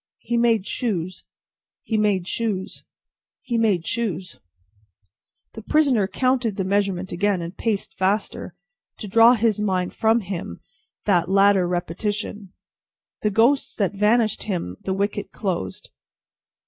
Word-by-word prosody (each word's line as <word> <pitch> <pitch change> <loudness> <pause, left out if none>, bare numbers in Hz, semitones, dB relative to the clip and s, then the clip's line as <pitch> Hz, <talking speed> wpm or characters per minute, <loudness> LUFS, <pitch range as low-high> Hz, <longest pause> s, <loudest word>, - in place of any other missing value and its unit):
"He 240 - -3
made 230 -4 +3
shoes, 185 -8 -3 0.6
he 225 - -2
made 205 -4 +1
shoes, 205 -5 -3 0.6
he 240 - -3
made 210 -7 +2
shoes." 190 - -3 1.1
The 220 - -8
prisoner 255 -5 +2
counted 250 0 0
the 195 - -1
measurement 190 -1 0
again, 195 +2 +1
and 170 +2 -6
paced 215 -4 -2
faster, 195 +3 -1 0.4
to 210 - -7
draw 230 +4 +6
his 225 -2 +1
mind 185 -3 0
with 225 0 +2
him 185 -2 -5
from - - -25 0.4
that 175 -4 +2
latter 195 -1 +4
repetition. 195 +3 -3 0.7
"The 210 - +2
ghosts 235 +7 +2
that 200 -2 0
vanished 215 +2 +2
when 170 - -2
the 190 - -2
wicket 200 0 -2
closed. 180 - -4
205 Hz, 130 wpm, -23 LUFS, 185-225 Hz, 1.1 s, draw